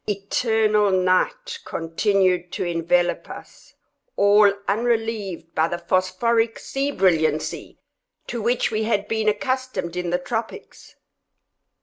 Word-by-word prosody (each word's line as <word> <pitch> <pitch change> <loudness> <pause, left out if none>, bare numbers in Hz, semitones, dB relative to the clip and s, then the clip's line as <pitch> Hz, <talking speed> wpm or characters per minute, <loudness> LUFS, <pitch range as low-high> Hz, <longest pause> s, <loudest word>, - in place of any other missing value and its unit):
Eternal 210 +1 +1
night 195 - 0
continued 180 - 0
to - - -3
envelop 175 0 0
us, - - -12 0.4
all 205 0 +5 0.2
unrelieved 220 -6 -1
by 160 +1 +2
the 175 - -3
phosphoric 225 +6 0
sea 275 +1 -3
brilliancy 160 - 0 0.5
to 235 - -5
which 235 +3 +1
we 215 0 -1
had 205 -2 0
been 220 -1 +1
accustomed 255 -5 -2
in 180 -1 -2
the 175 - +1
tropics. 225 +5 -6
205 Hz, 110 wpm, -22 LUFS, 180-225 Hz, 0.5 s, all